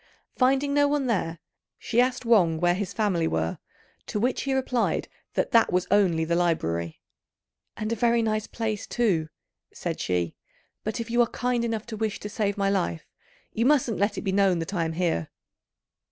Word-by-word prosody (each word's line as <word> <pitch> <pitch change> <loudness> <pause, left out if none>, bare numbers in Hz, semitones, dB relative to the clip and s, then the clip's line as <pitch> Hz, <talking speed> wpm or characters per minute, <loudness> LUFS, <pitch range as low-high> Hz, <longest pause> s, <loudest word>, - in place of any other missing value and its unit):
Finding 270 +2 +2
no 290 0 +4
one 285 -1 0
there, 180 -8 -1 0.4
she 240 +1 +1
asked 250 0 0
Wang 180 -9 +4
where 175 +1 +3
his 190 0 -3
family 190 -7 +1
were; 80 - -1 0.5
to 210 - -2
which 245 +4 0
he 275 - -1
replied 255 -2 0 0.3
that - - 0
that 230 -3 +5
was 180 0 +1
only 180 -6 +3
the 170 +1 0
library. 85 - 0 0.8
"And 215 +1 -3
a - - -1
very 235 +1 +2
nice 215 -1 -1
place, 220 -3 -3
too," 185 -10 +1 0.4
said - - -4
she; 90 -2 -1 0.5
"but 215 +2 -3
if 230 0 -5
you 240 +1 +4
are 235 - +4
kind 245 -1 -1
enough 225 -2 -2
to 230 - -6
wish 215 -1 -2
to 210 - -5
save 205 -1 -1
my 200 -1 +1
life, 85 - -1 0.5
you 230 +3 +1
mustn't 260 -7 +2
let 205 0 +1
it - - -2
be 195 - 0
known 195 -2 +3
that 165 +4 -4
I 170 -3 0
am 160 - -3
here." 165 - -1
210 Hz, 190 wpm, -26 LUFS, 170-235 Hz, 0.8 s, that